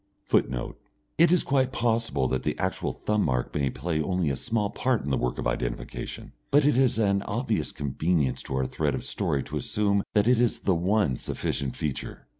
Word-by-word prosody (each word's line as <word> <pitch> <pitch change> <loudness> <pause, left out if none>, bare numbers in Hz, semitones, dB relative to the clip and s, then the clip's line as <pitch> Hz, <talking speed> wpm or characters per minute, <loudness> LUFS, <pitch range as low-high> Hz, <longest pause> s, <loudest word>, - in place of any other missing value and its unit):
[Footnote: 60 -1 0 0.4
It 170 +1 +6
is 180 - +4
quite 135 -2 +2
possible 115 - +1
that 65 - 0
the - - -2
actual - - -1
thumb 105 -1 0
mark 65 -4 -1
may 70 -2 +1
play 80 +3 -2
only 90 -2 0
a - - -1
small 105 - -1
part 130 -3 0
in 70 - -3
the - - +3
work 60 - -1
of - - -4
identification, - - -3 0.2
but 145 0 +4
it 145 - +4
is 130 -2 +3
an 100 -3 +2
obvious 115 +1 -1
convenience 75 0 0
to 65 - -5
our 65 0 +1
thread - - -1
of - - -5
story 70 -2 -1
to - - -5
assume 100 -1 +1
that 105 +1 +4
it 125 -1 +4
is 120 - +1
the 95 - +2
one 90 - +1
sufficient 70 -2 -3
feature. 75 -4 -4
100 Hz, 200 wpm, -27 LUFS, 70-115 Hz, 0.4 s, It